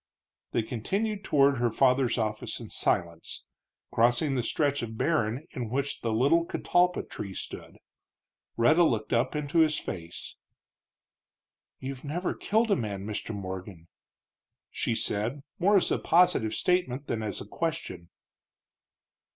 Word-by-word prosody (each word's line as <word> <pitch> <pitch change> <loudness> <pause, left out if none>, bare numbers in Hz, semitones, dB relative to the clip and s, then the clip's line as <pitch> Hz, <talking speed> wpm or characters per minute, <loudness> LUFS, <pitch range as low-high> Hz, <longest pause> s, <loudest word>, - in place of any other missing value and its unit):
They 115 - +1
continued 195 - -2
toward 140 -5 +3
her 120 0 +2
father's 130 +1 +3
office 110 -2 -2
in - - -9
silence, 85 -1 -2 0.5
crossing 120 +5 +3
the 130 - +1
stretch 145 +4 0
of 110 -1 -6
barren 135 -3 0
in 120 -4 -4
which 140 +3 -2
the 115 - -1
little 140 +9 +3
catalpa 180 +1 +1
tree 100 -2 -7
stood. - - -7 0.8
Rhetta 135 +9 +5
looked 110 -8 0
up 120 +5 +1
into 150 +2 0
his 155 -2 +4
face. 85 -2 -7 1.4
"You've 130 0 -6
never 170 +5 -2
killed 220 +1 +1
a - - +5
man, 100 -5 -4
Mr. 105 +1 -4
Morgan," 95 -3 -7 0.8
she 115 - -1
said, 115 +7 -1 0.2
more 200 +3 +5
as 185 - +2
a - - +1
positive 160 -10 +3
statement 145 -7 0
than 115 -4 -2
as 105 -1 -3
a - - -7
question. 105 - -4
125 Hz, 135 wpm, -28 LUFS, 110-160 Hz, 1.4 s, Rhetta